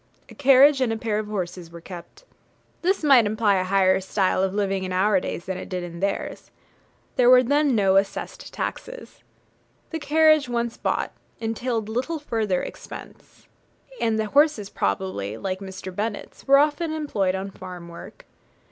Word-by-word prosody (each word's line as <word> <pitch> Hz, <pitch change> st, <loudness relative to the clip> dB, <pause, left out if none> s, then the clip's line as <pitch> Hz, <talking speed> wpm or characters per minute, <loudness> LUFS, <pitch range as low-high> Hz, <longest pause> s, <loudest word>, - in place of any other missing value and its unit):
A -, -, -12 dB
carriage 275 Hz, 0 st, +5 dB
and 250 Hz, -3 st, +2 dB
a 225 Hz, -, -1 dB
pair 220 Hz, -2 st, -1 dB
of 215 Hz, -, -4 dB
horses 180 Hz, -4 st, -5 dB
were 170 Hz, 0 st, -11 dB
kept. 175 Hz, -, -11 dB, 0.6 s
This 370 Hz, 0 st, +1 dB
might 265 Hz, -7 st, +6 dB
imply 210 Hz, -2 st, +2 dB
a 185 Hz, -, +1 dB
higher 190 Hz, 0 st, +3 dB
style 190 Hz, 0 st, 0 dB
of 190 Hz, 0 st, +1 dB
living 195 Hz, -1 st, -1 dB
in 185 Hz, -, -4 dB
our 190 Hz, +2 st, +3 dB
days 175 Hz, -, -5 dB
than 190 Hz, -1 st, -4 dB
it -, -, -8 dB
did 180 Hz, -1 st, -3 dB
in 170 Hz, -1 st, -8 dB
theirs. 200 Hz, +2 st, -3 dB, 0.7 s
There 245 Hz, -1 st, +5 dB
were 255 Hz, 0 st, +7 dB
then 285 Hz, +1 st, +2 dB
no 195 Hz, -2 st, +3 dB
assessed 195 Hz, 0 st, -2 dB
taxes. -, -, -6 dB, 0.7 s
The 325 Hz, -, -3 dB
carriage, 310 Hz, -2 st, +4 dB
once 235 Hz, -1 st, -2 dB
bought, -, -, -2 dB, 0.3 s
entailed 225 Hz, 0 st, -2 dB
little 255 Hz, +9 st, -2 dB
further 220 Hz, -10 st, -1 dB
expense; -, -, -11 dB, 0.5 s
and 225 Hz, -1 st, +1 dB
the 220 Hz, -, 0 dB
horses 275 Hz, -4 st, +2 dB
probably, 100 Hz, +1 st, -2 dB
like 185 Hz, +7 st, -3 dB
Mr. 190 Hz, -1 st, -8 dB
Bennet's, 210 Hz, +5 st, -5 dB
were 275 Hz, 0 st, +7 dB
often 300 Hz, +3 st, +1 dB
employed 215 Hz, -12 st, -1 dB
on 195 Hz, +1 st, -5 dB
farm 180 Hz, -2 st, -9 dB
work. 170 Hz, 0 st, -12 dB
210 Hz, 165 wpm, -24 LUFS, 185-260 Hz, 0.7 s, were